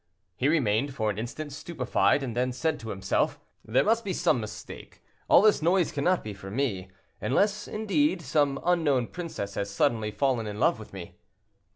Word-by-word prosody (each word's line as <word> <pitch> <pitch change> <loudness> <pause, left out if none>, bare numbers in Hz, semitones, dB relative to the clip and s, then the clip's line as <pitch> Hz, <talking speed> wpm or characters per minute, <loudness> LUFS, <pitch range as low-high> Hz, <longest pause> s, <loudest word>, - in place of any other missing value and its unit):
He 125 - 0
remained 135 -3 +1
for 110 -3 0
an 105 - -6
instant 140 +6 -5
stupefied, 140 -2 0
and 120 -4 -4
then 125 +1 +1
said 160 +6 -1
to 115 - -8
himself, 95 -2 0 0.2
"There 110 +4 +2
must 225 +2 +2
be 190 - -2
some 125 - +2
mistake; 110 0 -9 0.2
all 185 - +6
this 215 -5 +4
noise 175 +2 +2
cannot 175 +5 +1
be 105 - -5
for 95 0 -10
me. 100 -5 -2 0.3
Unless, 205 +9 +1
indeed, 215 - 0
some 140 0 +1
unknown 150 -9 +2
princess 160 - -5
has 100 0 -3
suddenly 110 0 +1
fallen 120 -1 0
in 105 0 -6
love - - +3
with 110 - -11
me." 95 -3 -9
135 Hz, 180 wpm, -27 LUFS, 110-170 Hz, 0.3 s, all